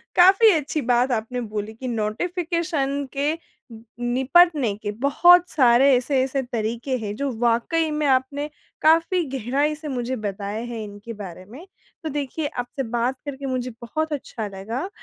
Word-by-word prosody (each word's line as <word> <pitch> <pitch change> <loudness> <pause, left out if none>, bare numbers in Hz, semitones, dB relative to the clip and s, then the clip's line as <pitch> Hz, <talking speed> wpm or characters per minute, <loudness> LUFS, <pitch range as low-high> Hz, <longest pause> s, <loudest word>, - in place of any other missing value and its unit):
काफ़ी 385 +5 +7
अच्छी 300 0 -1
बात 245 +2 +3
आपने 245 +2 -2
बोली 215 -1 -5
कि 255 +4 -7
नोटिफिकेशन 285 - -1
के 285 +3 +1 0.7
निपटने 265 - +3
के 205 - -2
बहुत 335 +10 +5
सारे 260 -1 +5
ऐसे-ऐसे 260 +1 0
तरीके 235 +2 -2
हैं, 210 -3 -5
जो 280 +3 -2
वाकई 240 +8 +1
में 300 0 -1
आपने 275 +2 +1 0.3
काफ़ी 330 +3 +4
गहराई 275 +6 0
से 305 0 -9
मुझे 255 -2 -2
बताए 205 0 -4
हैं 235 -2 -5
इनके 205 +2 -9
बारे 185 -4 -9
में। 255 - -12 0.4
तो 315 - -2
देखिए 290 +1 -3
आपसे 250 +1 -4
बात 245 +3 0
करके 280 -1 -6
मुझे 255 -1 -2
बहुत 310 +6 -2
अच्छा 235 -6 -5
लगा, 220 - -5
260 Hz, 150 wpm, -23 LUFS, 230-300 Hz, 0.7 s, काफ़ी